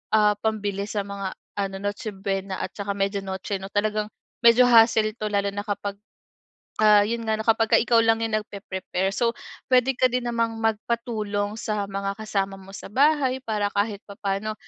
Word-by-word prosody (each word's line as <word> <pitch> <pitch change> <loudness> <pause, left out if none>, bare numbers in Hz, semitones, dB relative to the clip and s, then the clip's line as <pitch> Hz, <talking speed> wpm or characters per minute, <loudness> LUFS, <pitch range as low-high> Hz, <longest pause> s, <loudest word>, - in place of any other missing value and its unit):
ah, 210 -1 +5
pambili 205 -2 -1
sa 210 - -1
mga 200 -1 -5 0.2
ano 195 -1 -2
Noche 205 +2 -3
Buena 195 0 -3
at - - -5
saka 200 -1 -3
Media 200 0 0
Noche 190 +1 -4
'no 195 - -7
talagang 210 0 0 0.4
medyo 235 +2 +7
hassle 225 -2 +5
to 215 - -1
lalo 200 -1 +1
na 205 0 -4
kapag, 205 -1 -3 0.9
ah, 210 -1 +7
yun 230 +2 -2
nga 220 - +2
na - - -2
kapagka 225 -1 +3
ikaw 235 0 +3
lang 225 0 +3
yung 225 -1 -2
nagpepre-prepare. 190 -2 -3
So 230 +3 +1 0.3
puwede 255 +1 +4
ka - - +4
din 250 0 -1
namang 230 -1 0
magpatulong 215 -2 -1
sa 210 -2 -2
mga 195 0 -2
kasama 195 -3 -2
mo 190 - -14
sa 195 - -8
bahay 270 -1 +3
para 210 -4 0
kahit 205 0 -1
papa'no, 200 +1 -3
210 Hz, 175 wpm, -24 LUFS, 200-225 Hz, 0.9 s, medyo